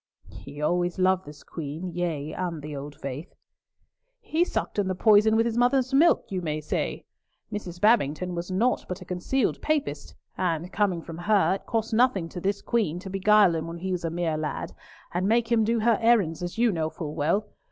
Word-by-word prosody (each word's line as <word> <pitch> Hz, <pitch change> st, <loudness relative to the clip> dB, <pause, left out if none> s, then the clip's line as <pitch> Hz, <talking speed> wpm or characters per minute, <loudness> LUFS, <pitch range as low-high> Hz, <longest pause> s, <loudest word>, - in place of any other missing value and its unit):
"He 145 Hz, +1 st, -10 dB
always 175 Hz, +3 st, 0 dB
loved 185 Hz, 0 st, +2 dB
this 150 Hz, 0 st, -11 dB
Queen, 160 Hz, +3 st, -6 dB
yea, 160 Hz, -4 st, -2 dB
and 170 Hz, -5 st, -4 dB
the 150 Hz, -1 st, -6 dB
old 145 Hz, +1 st, -7 dB
faith." 140 Hz, +2 st, -7 dB, 0.8 s
"He 345 Hz, -7 st, +1 dB
sucked 350 Hz, -, -3 dB
in 200 Hz, -, +1 dB
the 185 Hz, -, -1 dB
poison 215 Hz, +2 st, +5 dB
with 225 Hz, +1 st, +3 dB
his 235 Hz, 0 st, 0 dB
mother's 255 Hz, +1 st, +2 dB
milk, 315 Hz, +5 st, +4 dB
you 185 Hz, -2 st, -2 dB
may 155 Hz, -2 st, -2 dB
say. 150 Hz, -, -3 dB, 0.5 s
Mrs. 180 Hz, -4 st, -6 dB
Babington 180 Hz, -, +2 dB
was 175 Hz, +1 st, -4 dB
naught 225 Hz, +7 st, +1 dB
but 180 Hz, +1 st, -5 dB
a -, -, -9 dB
concealed 180 Hz, +10 st, -1 dB
Papist, 305 Hz, -2 st, -2 dB, 0.2 s
and, 175 Hz, 0 st, -2 dB
coming 190 Hz, -5 st, 0 dB
from 165 Hz, 0 st, -8 dB
her, 200 Hz, +1 st, +3 dB
it 195 Hz, -, -6 dB
cost 225 Hz, 0 st, -1 dB
nothing 220 Hz, -7 st, +3 dB
to 175 Hz, -, -7 dB
this 200 Hz, +2 st, -1 dB
Queen 210 Hz, -9 st, 0 dB
to 190 Hz, +1 st, -8 dB
beguile 195 Hz, -1 st, +5 dB
him 160 Hz, 0 st, -3 dB
when 165 Hz, 0 st, -6 dB
he 185 Hz, +2 st, -4 dB
was 180 Hz, -2 st, -2 dB
a 165 Hz, -, -1 dB
mere 165 Hz, -1 st, -1 dB
lad, 155 Hz, -1 st, -4 dB, 0.4 s
and 180 Hz, +2 st, 0 dB
make 230 Hz, +1 st, +2 dB
him 230 Hz, -2 st, +4 dB
do 230 Hz, +1 st, +1 dB
her 230 Hz, 0 st, +3 dB
errands, 215 Hz, -9 st, +3 dB
as 175 Hz, +4 st, -5 dB
you 235 Hz, 0 st, +3 dB
know 160 Hz, -3 st, -1 dB
full 155 Hz, -2 st, -6 dB
well. 165 Hz, +8 st, +1 dB
185 Hz, 205 wpm, -26 LUFS, 165-220 Hz, 0.8 s, poison